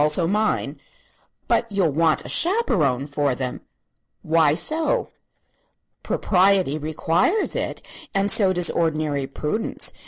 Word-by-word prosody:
Also 150 Hz, +3 st, +2 dB
mine." 210 Hz, +5 st, -1 dB, 0.7 s
"But 230 Hz, -, 0 dB
you'll 190 Hz, -6 st, +1 dB
want 160 Hz, +2 st, +1 dB
a -, -, -7 dB
chaperone 200 Hz, -, +1 dB
for 145 Hz, -2 st, -1 dB
them." 125 Hz, 0 st, -5 dB, 0.6 s
"Why 155 Hz, -2 st, +3 dB
so?" 315 Hz, -, -1 dB, 0.9 s
"Propriety 185 Hz, -5 st, +1 dB
requires 160 Hz, -, 0 dB
it; -, -, -4 dB, 0.3 s
and 195 Hz, +1 st, 0 dB
so 195 Hz, -3 st, +4 dB
does 180 Hz, -2 st, +2 dB
ordinary 155 Hz, -4 st, -1 dB
prudence. 150 Hz, +10 st, -3 dB
165 Hz, 115 wpm, -22 LUFS, 150-200 Hz, 0.9 s, so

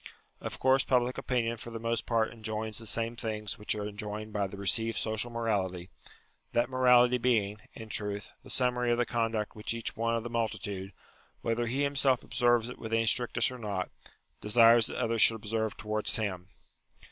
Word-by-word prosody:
Of -, -, -6 dB
course 130 Hz, +1 st, +4 dB
public 125 Hz, -1 st, +1 dB
opinion 115 Hz, -2 st, -1 dB
for 120 Hz, -, -7 dB
the 115 Hz, -, -6 dB
most 115 Hz, +1 st, -2 dB
part 115 Hz, -1 st, +1 dB
enjoins 110 Hz, -1 st, -3 dB
the 115 Hz, -, -6 dB
same 115 Hz, +2 st, -1 dB
things 110 Hz, -2 st, -4 dB
which 105 Hz, -, 0 dB
are 105 Hz, -1 st, -4 dB
enjoined 105 Hz, +1 st, -6 dB
by 100 Hz, -1 st, 0 dB
the 100 Hz, -, -10 dB
received 110 Hz, +4 st, +2 dB
social 110 Hz, +2 st, 0 dB
morality; 100 Hz, -6 st, -2 dB, 0.6 s
that 120 Hz, +2 st, +1 dB
morality 125 Hz, -1 st, +5 dB
being, 110 Hz, -4 st, +1 dB, 0.2 s
in 110 Hz, -, -8 dB
truth, 105 Hz, -1 st, -2 dB
the -, -, -15 dB
summary 125 Hz, -1 st, +1 dB
of 120 Hz, -, +2 dB
the 120 Hz, -, +2 dB
conduct 115 Hz, -3 st, -2 dB
which 105 Hz, +2 st, -2 dB
each 115 Hz, -, -4 dB
one 115 Hz, +1 st, 0 dB
of 115 Hz, -, -2 dB
the 120 Hz, -, -5 dB
multitude, 105 Hz, -4 st, -3 dB, 0.5 s
whether 115 Hz, +1 st, 0 dB
he 135 Hz, +5 st, 0 dB
himself 140 Hz, -3 st, +2 dB
ob -, -, -13 dB
serves 120 Hz, -1 st, +3 dB
it 125 Hz, -, -9 dB
with 110 Hz, 0 st, -6 dB
any 115 Hz, 0 st, +2 dB
strictness 120 Hz, +2 st, +1 dB
or 125 Hz, -, -8 dB
not, 100 Hz, -4 st, -3 dB, 0.5 s
desires 115 Hz, +1 st, +6 dB
that -, -, -6 dB
others 115 Hz, -1 st, +1 dB
should 115 Hz, -, +8 dB
observe 110 Hz, 0 st, -2 dB
towards 110 Hz, +3 st, -1 dB
him. 95 Hz, -6 st, -3 dB
115 Hz, 190 wpm, -30 LUFS, 105-120 Hz, 0.6 s, should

